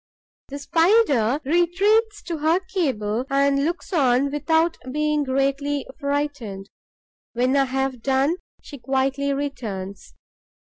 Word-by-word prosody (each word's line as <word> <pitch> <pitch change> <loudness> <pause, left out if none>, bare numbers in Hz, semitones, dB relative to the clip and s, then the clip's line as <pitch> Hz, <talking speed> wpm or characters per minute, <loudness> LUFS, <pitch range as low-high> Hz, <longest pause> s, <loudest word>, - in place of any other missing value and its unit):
The 280 - -7
Spider 290 - +3
retreats 390 - +2
to 335 -3 -4
her 320 +4 +2
cable 260 - -2
and 275 0 +2
looks 345 +5 -3
on 275 -3 +2
without 320 +3 +1 0.2
being 300 +1 0
greatly 275 +1 -1
frightened. 280 -9 -3 0.6
When 250 +3 +1
I 275 -1 +4
have 265 -1 -2
done, 270 +6 +1 0.3
she 285 - -10
quietly 270 +2 0
returns. 225 -9 -5
280 Hz, 110 wpm, -23 LUFS, 265-320 Hz, 0.6 s, I